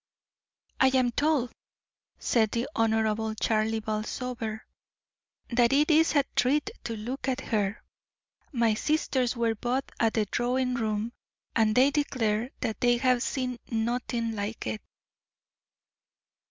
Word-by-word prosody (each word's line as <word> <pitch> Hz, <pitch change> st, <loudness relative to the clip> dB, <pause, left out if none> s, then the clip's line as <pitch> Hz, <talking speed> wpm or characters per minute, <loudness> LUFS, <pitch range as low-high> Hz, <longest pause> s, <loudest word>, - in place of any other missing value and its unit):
"I 265 Hz, -, +6 dB
am 255 Hz, -2 st, +3 dB
told," 285 Hz, -2 st, +1 dB, 0.7 s
said 220 Hz, -3 st, +2 dB
the 235 Hz, +3 st, -1 dB
Honorable 220 Hz, -1 st, +1 dB
Charlie 220 Hz, 0 st, +1 dB
Balsover, 220 Hz, +1 st, -3 dB, 0.9 s
"that 235 Hz, 0 st, +4 dB
it 295 Hz, +4 st, +4 dB
is 315 Hz, +1 st, +4 dB
a 285 Hz, -, +5 dB
treat 295 Hz, +10 st, +2 dB
to 230 Hz, -, -3 dB
look 250 Hz, +6 st, -5 dB
at 260 Hz, 0 st, 0 dB
her. 210 Hz, -5 st, -1 dB, 0.7 s
My 235 Hz, -5 st, +2 dB
sisters 260 Hz, -1 st, 0 dB
were 230 Hz, -1 st, +1 dB
both 245 Hz, +5 st, -1 dB, 0.2 s
at 225 Hz, -1 st, +2 dB
the 220 Hz, -2 st, +2 dB
drawing 250 Hz, +4 st, 0 dB
room, 220 Hz, -1 st, -1 dB, 0.4 s
and 220 Hz, -2 st, +3 dB
they 265 Hz, +3 st, +5 dB
declare 240 Hz, -6 st, 0 dB
that 220 Hz, -, -3 dB
they 240 Hz, -1 st, +4 dB
have 250 Hz, 0 st, +2 dB
seen 250 Hz, -2 st, -2 dB
nothing 230 Hz, 0 st, -1 dB
like 205 Hz, +2 st, -4 dB
it." 110 Hz, -1 st, -3 dB
235 Hz, 125 wpm, -28 LUFS, 220-255 Hz, 0.9 s, I